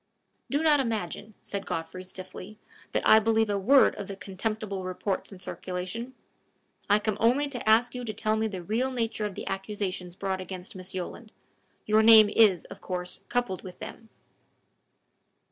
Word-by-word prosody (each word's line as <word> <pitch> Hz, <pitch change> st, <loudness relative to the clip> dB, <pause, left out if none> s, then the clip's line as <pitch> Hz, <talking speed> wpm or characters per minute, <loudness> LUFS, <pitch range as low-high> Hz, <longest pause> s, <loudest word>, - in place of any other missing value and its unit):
"Do 290 Hz, +3 st, 0 dB
not 300 Hz, -2 st, +5 dB
imagine," 220 Hz, -3 st, -3 dB
said 200 Hz, -1 st, -5 dB
Godfrey, 165 Hz, +3 st, -4 dB
stiffly, 185 Hz, +2 st, -9 dB, 0.3 s
"that -, -, 0 dB
I 220 Hz, -, +8 dB
believe 220 Hz, -1 st, +2 dB
a 200 Hz, -, 0 dB
word 265 Hz, +8 st, +5 dB
of 200 Hz, -, -5 dB
the 195 Hz, -, -6 dB
contemptible 200 Hz, 0 st, -4 dB
reports 185 Hz, +2 st, -3 dB
in 195 Hz, -, -11 dB
circulation. 185 Hz, +8 st, -5 dB, 0.7 s
I 205 Hz, -, +6 dB
come 210 Hz, -1 st, -1 dB
only 255 Hz, +6 st, +3 dB
to 245 Hz, -5 st, -3 dB
ask 230 Hz, +3 st, +5 dB
you 250 Hz, -1 st, -5 dB
to 220 Hz, -, -3 dB
tell 215 Hz, +1 st, +1 dB
me 220 Hz, 0 st, 0 dB
the 190 Hz, -4 st, -6 dB
real 230 Hz, +8 st, 0 dB
nature 230 Hz, -4 st, -2 dB
of 205 Hz, -3 st, -4 dB
the -, -, -6 dB
accusations 195 Hz, -3 st, -4 dB
brought 190 Hz, -1 st, -2 dB
against 185 Hz, 0 st, -8 dB
Miss 185 Hz, 0 st, -8 dB
Yolland: 215 Hz, +4 st, -6 dB, 0.5 s
your 215 Hz, +1 st, +4 dB
name 220 Hz, -2 st, +8 dB
is, 200 Hz, -7 st, +4 dB
of -, -, -11 dB
course, 180 Hz, -1 st, -3 dB
coupled 245 Hz, -6 st, -1 dB
with 180 Hz, -1 st, -10 dB
them." 225 Hz, -, -9 dB
210 Hz, 170 wpm, -28 LUFS, 185-225 Hz, 0.7 s, I